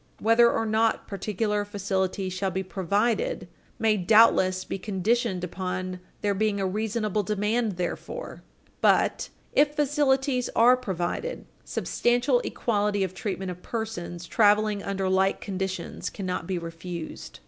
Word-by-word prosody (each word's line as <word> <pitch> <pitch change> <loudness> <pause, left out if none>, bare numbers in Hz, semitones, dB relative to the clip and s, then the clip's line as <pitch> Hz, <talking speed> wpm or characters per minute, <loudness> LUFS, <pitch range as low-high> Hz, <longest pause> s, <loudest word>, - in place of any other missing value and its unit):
Whether 230 +2 +5
or 225 - 0
not 220 +1 +1
particular 210 +1 -1
facilities 195 -2 -2
shall 190 +1 -1
be 190 +1 -2
provided 205 - 0 0.3
may 220 -1 +2
doubtless 185 -2 +4
be - - -4
conditioned 205 0 0
upon 185 0 -4 0.2
there 205 -1 +1
being 205 0 0
a 195 - 0
reasonable 215 +1 -1
demand 210 +2 0
therefor, 180 - -5 0.4
but, - - +3 0.2
if 295 0 +3
facilities 275 -3 +1
are 245 +2 +7
provided, 235 - -3 0.2
substantial 245 +1 +1
equality 205 -4 0
of 185 -1 -3
treatment 190 -1 -3
of 180 0 -9
persons 180 -7 -5
traveling 210 +1 +3
under 195 -1 -2
like 190 +1 +2
conditions 190 -2 -4
cannot 185 -3 -4
be 185 - -1
refused. 170 0 -7
205 Hz, 125 wpm, -26 LUFS, 185-225 Hz, 0.4 s, are